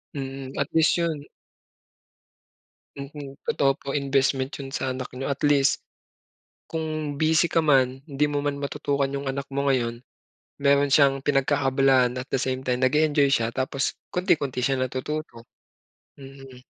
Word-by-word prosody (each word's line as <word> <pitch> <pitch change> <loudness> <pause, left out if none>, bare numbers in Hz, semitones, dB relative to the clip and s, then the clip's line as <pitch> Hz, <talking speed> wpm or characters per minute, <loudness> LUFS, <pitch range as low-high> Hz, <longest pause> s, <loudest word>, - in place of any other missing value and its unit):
Mm, 135 -1 -5
at 140 - 0
least 160 +1 +4
yun 165 -4 -1 1.8
Mm, 140 0 -8
totoo 135 0 +3
po - - -17
investment 135 -1 +1
yun 135 - -6
sa 130 - -1
anak 130 0 -6
niyo. 135 +2 -3
At 140 - -5
least 140 -1 +3 0.9
kung 155 -2 -3
busy 160 +2 +4
ka 165 - +2
man, 135 -3 +3
'di 140 +1 +1
mo 145 -1 -1
man 145 -1 -1
matutukan 140 0 -1
yung 140 -1 -3
anak 140 +1 -3
mo 140 0 0
ngayon, 120 -2 0 0.6
meron 140 0 +3
siyang 135 -1 +4
pinagkakaabalahan 135 -2 +3
at 130 - -6
the - - 0
same 130 0 -2
time 125 0 +1
nag-e-enjoy 145 +1 +3
siya 115 -3 +2
tapos 135 +1 -1 0.2
konti-konti 145 -8 0
siya 135 +2 +1
natututo. 130 -2 -5 0.8
Mhm. 135 -2 -12
140 Hz, 145 wpm, -25 LUFS, 130-145 Hz, 1.8 s, least